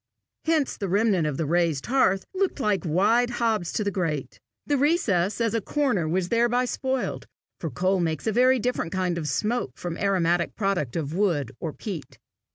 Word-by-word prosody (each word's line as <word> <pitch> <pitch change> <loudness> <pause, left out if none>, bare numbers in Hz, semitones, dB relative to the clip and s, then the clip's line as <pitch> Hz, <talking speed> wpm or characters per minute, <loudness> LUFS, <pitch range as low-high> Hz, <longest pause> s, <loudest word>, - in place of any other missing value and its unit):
Hence 315 -4 +1
the 195 - -3
remnant 195 -4 +2
of 145 -3 -2
the 160 - -1
raised 165 -2 +1
hearth 215 -7 +2
looked 380 -4 0
like 210 -8 +1
wide 205 +9 +3
hobs 225 -7 0
to 215 - 0
the 200 - -1
grate. 165 -7 -3 0.3
The 290 - +1
recess 240 - +1
as 230 -1 +1
a 230 - +1
chimney - - -15
corner 255 - +2
was 180 +1 0
thereby 240 +2 +2
spoiled, 260 +1 -2 0.3
for 165 - -3
coal 185 +8 +1
makes 160 -4 -1
a 220 - +2
very 255 +4 +4
different 245 -8 -2
kind 180 -2 0
of 155 - -4
smoke 215 - -1
from 175 -2 -4
the 170 - -5
aromatic 175 -3 +1
product 195 - -1
of 155 -2 -2
wood 170 - +1
or 160 - -3
peat. 175 -3 -7
195 Hz, 190 wpm, -25 LUFS, 170-240 Hz, 0.3 s, very